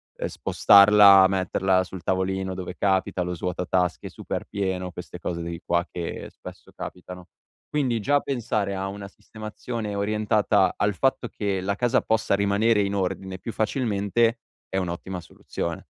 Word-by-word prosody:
ehm, - - -3
spostarla, 100 -1 +7
metterla 95 0 +1
sul 95 -1 -9
tavolino 95 0 -1
dove 90 -1 -6
capita, 95 -2 +1
lo 90 - -3
svuota 90 +1 -3
tasche 90 -1 0
super - - -5
pieno, 95 -2 -3
queste 90 0 -9
cose 85 -1 -4
di 85 0 -6
qua 85 0 +1
che 85 -2 -5
spesso - - -12
capitano. 90 0 -9 0.4
Quindi, 130 -7 0
già 145 +5 +3
pensare 110 -7 -2
a 95 0 -3
una 100 0 -7
sistemazione 110 +1 -7
orientata 105 -1 +2
al 105 0 +1
fatto 130 +3 0
che 100 -3 -2
la 100 +2 -1
casa 120 +3 +2
possa 110 -2 0
rimanere 100 +2 +2
in 100 0 -1
ordine 95 0 -3
più 115 +4 -6
facilmente 115 0 0 0.3
è - - -7
un'ottima 90 0 -4
soluzione. 85 0 -6
100 Hz, 150 wpm, -25 LUFS, 90-105 Hz, 0.4 s, spostarla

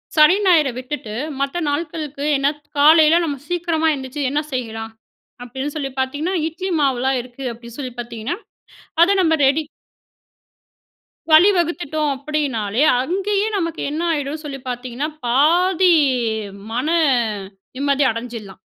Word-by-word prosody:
சனி, 305 +4 +7
ஞாயிறு 310 -7 +4
விட்டுட்டு 255 -4 -6 0.3
மத்த 280 +5 -1
நாள்களுக்கு 300 -2 -4
என்ன, 275 +1 +1 0.3
காலையில 310 +2 +6
நம்ம 290 -4 -2
சீக்கிரமா 335 -2 0
எழுந்திரிச்சு 270 +1 -5
என்ன 295 +2 0
செய்யலாம்? 225 -3 -4 0.5
அப்படீன்னு 265 +4 -5
சொல்லி 275 -3 -3
பார்த்தீங்கன்னா, 290 +8 -1
இட்லி 370 +4 -5
மாவுல்லாம் 265 -1 +1
இருக்கு 250 +2 -11
அப்படீன்னு 235 +1 -11
சொல்லி 255 -3 -5
பார்த்தீங்கன்னா, 235 +6 -4 0.7
அதை 365 +4 +6
நம்ம 320 -2 +3
ரெடி 290 +4 +2 1.7
வழிவகுத்துட்டோம் 325 -4 +3
அப்படின்னாலே, 265 -6 -2 0.2
அங்கயே 395 +7 0
நமக்கு 335 -2 -3
என்ன 310 +3 -3
ஆயிடுன்னு 300 +1 -3
சொல்லி 275 -2 -6
பார்த்தீங்கன்னா, 250 +4 -4 0.2
பாதி 345 +8 +4 0.8
மன 255 +5 -1 0.9
நிம்மதி 280 +1 +1
அடஞ்சுடலாம். 230 -4 -7
290 Hz, 115 wpm, -20 LUFS, 255-325 Hz, 1.7 s, சனி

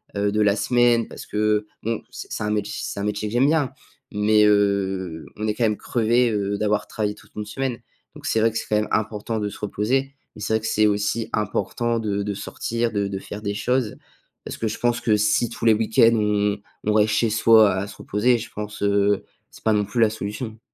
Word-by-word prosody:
heu, 100 0 +1
de 105 - 0
la 100 -1 +4
semaine. 120 +2 +3
Parce - - -9
que 105 0 0 0.2
bon, 115 0 -2
c'est - - -7
un 105 - -1
mét 105 -1 +1
c'est - - -5
un - - -2
métier 105 0 -2
que - - -8
j'aime 125 +4 +4
bien, 150 -4 +1 0.4
mais 105 +1 +4
heu, 95 -5 +1
on 110 +1 -2
est 105 - +1
quand 120 - +1
même 105 -1 +1
crevé, 120 +1 +1
heu, 100 -1 -1
d'avoir 105 0 0
travaillé 105 -1 -2
toute 105 0 -19
une 105 - -3
semaine, 125 +3 -3 0.4
donc - - -11
c'est 115 - +2
vrai 115 - +3
que 115 - -3
c'est - - -4
quand 105 - +3
même 105 - 0
important 110 +1 -1
de 105 -1 -2
se - - -11
reposer, 130 +7 -1 0.2
mais - - -10
c'est 110 - -1
vrai 110 - +2
que 115 - -3
c'est 110 -1 +3
aussi 105 +2 0
important 115 +2 -1
de 100 -2 -1
de 105 - -2
sortir, 115 +3 -2
de 100 -1 0
de 95 - -4
faire 105 +2 -8
des 100 -1 -3
choses 125 +1 0 0.5
parce - - -5
que 115 - -1
je - - -5
pense 120 0 +1
que 110 -3 +3
si 105 +2 +2
tous 115 - -6
les 115 - +7
week-ends 115 +1 +4
on 105 -1 +1 0.3
on 105 - +2
reste 105 0 +3
chez 115 +1 +2
soi 110 -2 +6
à 95 +1 -2
se 100 - -11
reposer, 120 +4 +1
je 115 +1 -7
pense, 105 0 -7
heu, 100 0 +2 0.3
c'est - - -16
pas 110 - +3
non 105 - +2
plus 105 +4 -3
la 110 - +5
solution. 110 +1 -5
105 Hz, 235 wpm, -23 LUFS, 105-115 Hz, 0.5 s, les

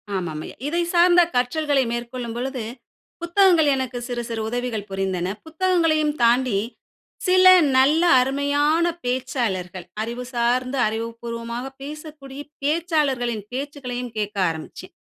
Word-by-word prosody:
ஆமாம் 165 -5 -3
ஐயா. - - -10
இதை 340 +3 0
சார்ந்த 350 0 +6
கற்றல்களை 275 +2 +1
மேற்கொள்ளும் 235 0 -5
பொழுது, 255 -1 -3 0.6
புத்தகங்கள் 340 -3 +4
எனக்கு 260 -2 -3
சிறு 240 -1 -3
சிறு 225 -1 -3
உதவிகள் 240 -4 -3
புரிந்தன. 190 -1 -2
புத்தகங்களையும் 320 -3 +1
தாண்டி 240 -2 +3 0.7
சில 370 0 +5 0.3
நல்ல 295 +6 +4 0.2
அருமையான 285 +5 +1 0.2
பேச்சாளர்கள், 235 -9 -2 0.2
அறிவு 235 +3 -4
சார்ந்த 250 +2 0
அறிவுபூர்வமாக 230 +2 -5 0.2
பேசக்கூடிய 290 -1 -9 0.2
பேச்சாளர்களின் 285 - 0
பேச்சுக்களையும் 250 -3 -5
கேக்க 205 -1 -3
ஆரம்பிச்சேன். 160 -1 -8
255 Hz, 105 wpm, -22 LUFS, 235-300 Hz, 0.7 s, சார்ந்த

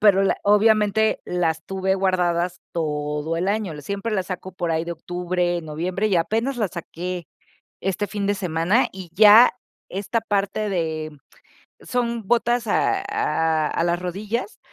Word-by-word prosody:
pero 195 -2 +5
la - - +2
obviamente 215 +1 +3
las 165 -3 -1
tuve 190 0 0
guardadas 180 -2 0
todo 150 0 -2
el 180 +3 -1
año, 200 -7 -2
siempre 200 +7 -4
las 190 -3 -1
saco 185 0 -5
por 175 -2 -2
ahí 160 +1 0
de 170 - -5
octubre, 175 +1 -2
noviembre, 180 +7 -2
y 190 - +2
apenas 225 +10 0
las 210 -6 -1
saqué, 175 0 -6 0.5
este 195 +2 -1
fin 205 0 -3
de 205 0 +1
semana, 180 +5 +1
y 185 -3 -9
ya 215 +5 +8 0.4
esta 205 +4 -2
parte 205 0 -1
de 160 -4 -2 0.7
son 235 -3 -2
botas 240 +1 +1
a 390 - +2
a 160 - +1
a 165 - -1
las 175 0 +1
rodillas, 205 - -4
190 Hz, 150 wpm, -23 LUFS, 170-210 Hz, 0.7 s, ya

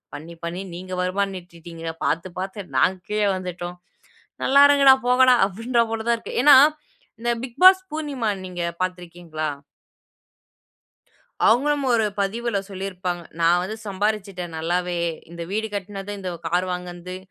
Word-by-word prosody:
பண்ணி 160 +4 -9
பண்ணி 175 +3 -4
நீங்க 185 +1 -7
வருமானம் 195 +1 -1
ஈட்டிட்டீங்க, 165 -1 -9
பாத்து 165 +4 -1
பாத்து 190 +1 -5
நாங்க 185 +7 +3
கீழே 210 0 +1
வந்துட்டோம், 180 -1 -6 0.7
நல்லா 280 +1 +6
இருங்கடா, 275 -2 +7
போங்கடா" 250 0 +6
அப்டின்றா 230 +5 0
போல 225 0 -2
தான் 235 - +3
இருக்கு. - - -7
ஏன்னா 290 0 +9 0.7
இந்த 240 0 +1
பிக் 255 +1 -8
பாஸ் 375 0 +9
பூர்ணிமா 290 -7 -2 0.2
நீங்க 180 -1 -6 0.2
பாத்துருக்கீங்களா? 175 -3 -4 2.0
அவுங்களும் 280 +5 +3
ஒரு 225 -2 +3 0.2
பதிவுல 220 +2 -1
சொல்லிருப்பாங்க. 185 -2 -4 0.2
நான் 170 +1 +4
வந்து 215 +4 -4
சம்பாரிச்சுட்டேன் 195 -3 -2
நல்லாவே 175 +2 -1 0.3
இந்த 170 0 -7
வீடு 220 +2 -1
கட்டுனது 200 0 -5
இந்த 185 -1 -4 0.2
கார் 175 +3 +1
வாங்குனது 180 0 -6
190 Hz, 130 wpm, -23 LUFS, 175-225 Hz, 2.0 s, ஏன்னா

